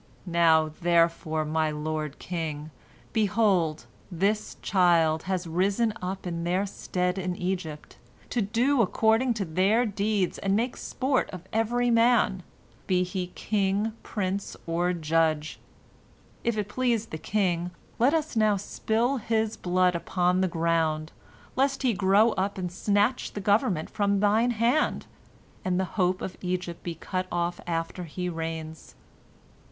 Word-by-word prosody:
"Now, 165 -3 +3
therefore, 165 -2 +2
my 155 0 +1
lord 150 -1 -3
king, 155 -3 -4 0.4
behold, 205 -7 +2 0.3
this 200 +5 -1
child 170 -4 +3
has 185 -2 -1
risen 195 +7 +1
up 185 +1 -4
in 170 -1 -3
their 180 +3 +1
stead 180 -1 -2
in 180 -1 -2
Egypt, 175 -5 -4 0.3
to 240 - +1
do 240 +6 +2
according 225 +4 +2
to 205 -3 -2
their 195 +9 +2
deeds 205 -2 0
and 195 0 +1
make 235 +4 0
sport 260 0 -1
of 185 -2 -8
every 240 +2 +1
man, 230 -5 +3 0.5
be 180 -1 +2
he 180 0 -3
king, 205 +1 0
prince, 200 -1 -3
or 175 +2 0
judge. 160 -2 0 0.8
If 235 -2 0
it 210 -1 -1
please 235 0 0
the 155 - -7
king, 180 -3 0 0.3
let 265 +7 +4
us 315 -4 -1
now 215 -2 +3
spill 225 +6 0
his 220 -1 0
blood 180 0 +2
upon 180 +1 +1
the 190 - +2
ground, 165 -2 0 0.4
lest 270 +1 +1
he 250 -3 +3
grow 200 +3 +4
up 195 +1 -2
and 180 -2 -3
snatch 205 +6 +1
the - - -4
government 200 - +1
from 200 -1 0
thine 215 +4 +3
hand, 240 +7 +1 0.6
and 185 0 0
the 190 - +1
hope 185 -1 +1
of 190 - -5
Egypt 180 -2 -3
be 170 -1 -5
cut 185 +3 -3
off 175 0 -1
after 165 +1 -3
he 180 +3 -4
reigns. 160 -1 -6
185 Hz, 140 wpm, -27 LUFS, 170-215 Hz, 0.8 s, let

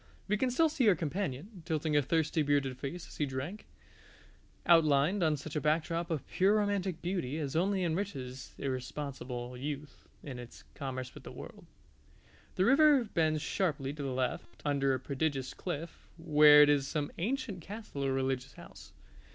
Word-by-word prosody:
We 210 - +2
can 255 +5 +1
still 320 +7 +3
see 265 -7 +3
our 190 - +5
companion, 180 - -4
tilting 155 -1 -1
a 145 - +5
thirsty 160 +2 +1
bearded 140 -3 +1
face 160 +6 -5
as - - -13
he 150 - 0
drank, 140 +10 -5 1.0
outlined 165 +2 +4
on 155 -3 +2
such 145 +2 -8
a 150 - 0
backdrop 165 +2 0
of 160 -5 -3
pure 195 +3 +3
romantic 200 -4 0
beauty 170 -6 -2
as 145 -2 -3
only 190 +3 +1
enriches 160 -8 -4
irresponsible 130 -2 -4
youth 145 +2 -6 0.2
in 130 -4 -7
its 120 -1 -11
commerce 130 -2 -5
with - - -11
the - - -9
world. - - -11 0.9
The 185 - +2
river 280 +1 +6
bends 160 -7 0
sharply 145 -7 -1
to 150 - -7
the 140 - -2
left 130 0 -3
under 140 -2 +2
a - - -3
prodigious 135 0 -2
cliff, 170 -2 -6
where 150 -2 +7
is 145 -2 +3
some 145 -1 -2
ancient 220 -2 -2
castle 200 -6 -6
or 135 - +1
religious 135 0 -1
house. - - -13
150 Hz, 165 wpm, -32 LUFS, 135-180 Hz, 1.0 s, where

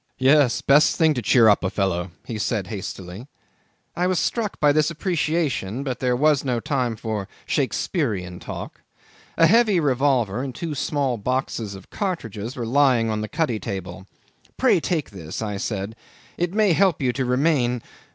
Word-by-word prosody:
"Yes. 135 -1 +4
Best 145 +2 +5
thing 160 -2 +3
to 125 - -3
cheer 115 +1 +5
up 105 -2 +4
a 95 - +1
fellow," 95 -2 -1 0.2
he 110 -2 -5
said 105 0 -1
hastily. 95 +2 -7 0.7
I 180 +1 +1
was 185 -2 +1
struck 220 -4 -2
by 145 -1 +5
this 150 +1 +2
appreciation, 155 - -1
but 130 -3 -3
there 125 -1 +1
was 150 +1 +3
no 125 -3 0
time 125 -2 -1
for 110 -3 -4 0.2
Shakespearian 110 - -1
talk. 85 - -8 0.6
A 165 - +6
heavy 210 0 +4
revolver 130 -6 +1
and 130 -3 -5
two 165 +1 -4
small 140 -3 -1
boxes 115 -2 -2
of 95 - -14
cartridges 120 - -4
were 120 - -4
lying 125 -3 +3
on 105 0 -2
the 110 - -4
cuddy 150 -8 -1
table. 95 -3 -6 0.5
"Pray - - +4
take 160 -9 -2
this," 85 -6 -7
I 105 -2 -3
said. 100 +1 -4 0.4
"It 175 0 -1
may 210 -2 +3
help 185 -1 +3
you 125 -3 0
to 135 - -1
remain." 125 -2 +1
125 Hz, 170 wpm, -23 LUFS, 105-150 Hz, 0.7 s, A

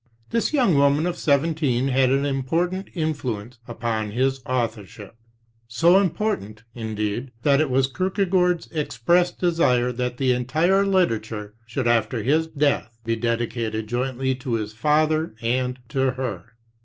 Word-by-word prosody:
This 230 - +1
young 255 - +3
woman 140 +2 +3
of 175 -1 -1
seventeen 140 -4 +1
had 130 0 +3
an 135 +1 +2
impor 145 +6 0
tant 190 +1 -5
influence 125 - -3
upon 115 -2 -2
his 130 +4 0
authorship; 110 -5 -4 0.5
so 170 +11 +4
important, 170 - -2
indeed, 110 +1 -3
that 140 0 +4
it 155 - 0
was 130 +1 +3
Kierkegaard's 180 +2 0
expressed 170 +4 +1
desire 145 -9 +2
that 125 0 -3
the 130 -1 +2
entire 160 +11 +2
literature 110 - 0
should 125 +2 -3
after 120 -1 +1
his 155 +6 +2
death 140 -7 0
be 115 0 0
dedicated 115 -1 -2
jointly 130 +3 -1
to 130 -1 -5
his 105 -1 -3
father 155 +4 +1
and 125 +2 -1
to 135 -2 +1
her. 120 -9 -4
130 Hz, 140 wpm, -23 LUFS, 115-160 Hz, 0.5 s, so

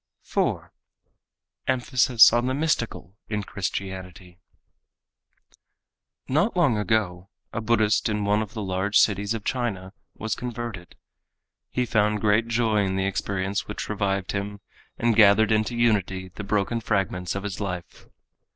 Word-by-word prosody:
4. - - -1 0.9
Emphasis 125 -2 +5
on 120 +1 +2
the 130 - 0
Mystical 135 - -2
in 105 -1 -2
Christianity 95 -2 -6 1.9
Not 165 - +1
long 150 -10 +4
ago 100 -3 -1 0.2
a 115 - -2
Buddhist 110 0 +2
in 105 -1 -1
one 105 +1 +2
of 110 +1 -6
the 110 - -3
large 95 +2 0
cities 100 +1 +2
of 110 - -6
China 105 -7 -3 0.2
was 110 +1 -3
converted. 120 -7 -6 0.7
He 125 - -1
found 105 -2 +1
great 110 +2 +2
joy 115 -3 +2
in 95 -1 -1
the 95 0 0
experience 100 0 -2
which - - -5
revived 100 -2 -1
him 100 0 -4 0.4
and 115 -1 +2
gathered 110 0 +6
into 110 +2 +1
unity 95 -5 +1
the 100 +3 -8
broken 105 +3 0
fragments 95 -4 -1
of 100 - -3
his 100 -2 -5
life. 90 -4 -6
105 Hz, 135 wpm, -25 LUFS, 95-115 Hz, 1.9 s, gathered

